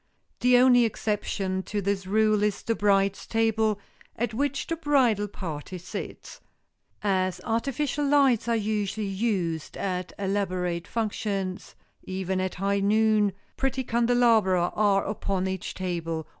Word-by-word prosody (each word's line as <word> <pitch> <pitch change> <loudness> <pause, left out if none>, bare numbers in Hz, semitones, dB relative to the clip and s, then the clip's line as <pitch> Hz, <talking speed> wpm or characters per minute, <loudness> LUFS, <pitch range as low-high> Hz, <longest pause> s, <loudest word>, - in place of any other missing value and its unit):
The 250 0 +5
only 245 -1 +6
exception 200 -3 -1
to 210 - -1
this 195 -1 -1
rule 215 +1 +3
is 210 -1 0
the 230 - 0
bride's 200 -2 +1
table 220 -2 +1 0.4
at 230 0 -2
which 280 +3 -1
the 330 - -2
bridal 265 -10 +2
party 180 -3 -6
sits. 180 - -8 0.6
As 185 -2 +1
artificial 275 +5 -1
lights 275 -6 +3
are 235 - +2
usually 215 -1 -1
used 190 -6 -2
at 185 -2 -3
elaborate 185 -3 -1
functions, 200 -4 -3 0.3
even 190 0 -2
at 185 -1 -2
high 200 +2 0
noon, 210 0 +3 0.2
pretty 265 -1 -1
candelabra 230 -7 +3
are 205 -2 +3
upon 195 -2 -2
each 190 -1 -4
table. 165 -3 -3
205 Hz, 130 wpm, -26 LUFS, 190-230 Hz, 0.6 s, only